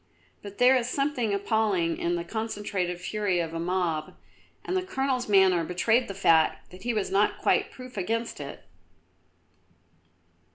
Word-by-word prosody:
But 205 -1 -10
there 250 +2 +6
is 245 -1 0
something 275 -5 0
appalling 200 -4 0
in 175 +1 0
the 170 - -3
concentrated 200 -3 -3
fury 195 -1 -1
of 165 -1 -3
a 165 - -3
mob, 170 -3 -1 0.5
and 370 - -2
the 370 - +2
Colonel's 270 - -2
manner 190 -4 +5
betrayed 220 +9 +1
the 195 - -6
fact 165 -4 +2
that 185 - -13
he 240 - -1
was 210 -4 -2
not 200 +2 +2
quite - - +2
proof 255 -3 -11
against 230 +5 -2
it. - - -8
200 Hz, 155 wpm, -27 LUFS, 180-235 Hz, 0.5 s, there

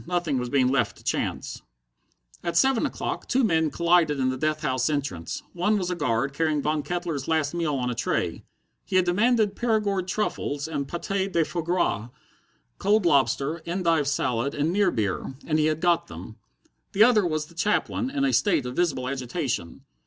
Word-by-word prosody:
Nothing 170 -6 0
was 125 0 -3
being 130 -1 +3
left 135 0 0
to - - -17
chance. - - -3 0.8
At 170 -1 -1
seven 265 -3 +3
o'clock - - -4
two 260 +1 +2
men 160 -7 +2
collided 170 -3 +2
in 130 -1 +2
the 130 - -1
death 155 +3 -1
house 130 -2 +1
entrance. 140 - -3
One 205 +5 +1
was 185 -2 -2
a - - -1
guard, 135 -3 0
carrying 155 0 +1
Von 150 +1 0
Kettler's 170 -5 -3
last 160 -2 +1
meal 165 -4 -1
on 125 -2 -1
a - - -1
tray. 120 -1 -2 0.4
He 190 - -5
had 185 -1 +4
demanded 210 +3 +2
Perigord 210 -5 0
truffles 155 -7 -2
and 145 -4 -3
paté 195 +4 -2
de 165 -3 +2
foie 170 - -3
gras, 160 - 0 0.7
cold 205 -1 +2
lobster, 145 +1 +2
endive 170 -4 +1
salad, 135 -2 0
and 150 +4 0
near 200 -1 +3
beer, 110 - -2
and 155 -1 +1
he 155 - +3
had 155 0 0
got 175 0 +2
them. 90 +6 -10 0.6
The 205 - +6
other 225 -3 +5
was 155 -3 -1
the 170 - -18
chaplain, 210 +7 0
in 275 0 0
a 270 - +1
state 170 - +2
of 125 0 -5
visible 150 -8 0
agitation. 130 - -3
160 Hz, 185 wpm, -25 LUFS, 140-180 Hz, 0.8 s, The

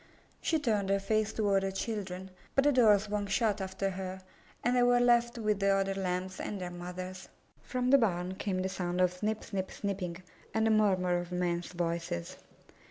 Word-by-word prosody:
She 325 - +2
turned 215 -9 0
her 200 - +4
face 215 +2 +1
toward 200 -3 +2
her 195 - -1
children, 190 -2 -4 0.2
but 275 - +5
the 290 - +5
door 225 -6 +6
swung 205 0 -3
shut 210 0 +1
after 190 +1 -2
her, 190 0 -6 0.4
and 245 +1 +2
they 250 - +4
were 245 0 +5
left 240 0 +3
with 215 -3 0
the 200 - +1
other 195 0 +2
Lambs 185 0 -3
and 205 - -4
their 180 -1 -4
mothers. 180 +1 -7 0.3
From 250 0 -1
the 275 - +8
barn 180 -5 0
came 190 -1 -2
the - - 0
sound 180 -2 -2
of 180 -1 +3
snip 215 +4 -2
snip 190 -2 -3
snipping 190 -4 -3 0.4
and 220 0 +3
the 225 - +4
murmur 185 -5 +3
of 175 0 -7
men's 175 -1 -1
voices. 170 - -3
195 Hz, 190 wpm, -31 LUFS, 180-215 Hz, 0.4 s, the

